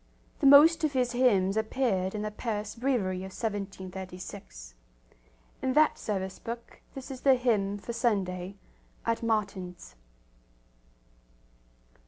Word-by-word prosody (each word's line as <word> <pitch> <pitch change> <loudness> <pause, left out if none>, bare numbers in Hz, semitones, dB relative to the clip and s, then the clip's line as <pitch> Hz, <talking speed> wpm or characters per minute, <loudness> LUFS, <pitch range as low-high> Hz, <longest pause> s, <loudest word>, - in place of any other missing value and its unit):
The 280 - +4
most 310 +4 +8
of 305 -2 +1
his 250 -2 +1
hymns 210 -7 +3
appeared 220 -4 0
in 210 - -3
the 215 - -3
Paris 210 -1 -4
Breviary 230 -7 0
of 190 +1 -6
1736. 190 - -6 0.9
In 260 - 0
that 305 +2 +4
service 190 -3 -3
book 235 0 -8
this 270 0 -7
is 260 -1 -7
the 270 -2 +5
hymn 210 -5 +1
for 235 +4 -6
Sunday 195 -5 -1 0.5
at 230 0 0
Matins. 200 - -2
210 Hz, 120 wpm, -29 LUFS, 190-250 Hz, 0.9 s, most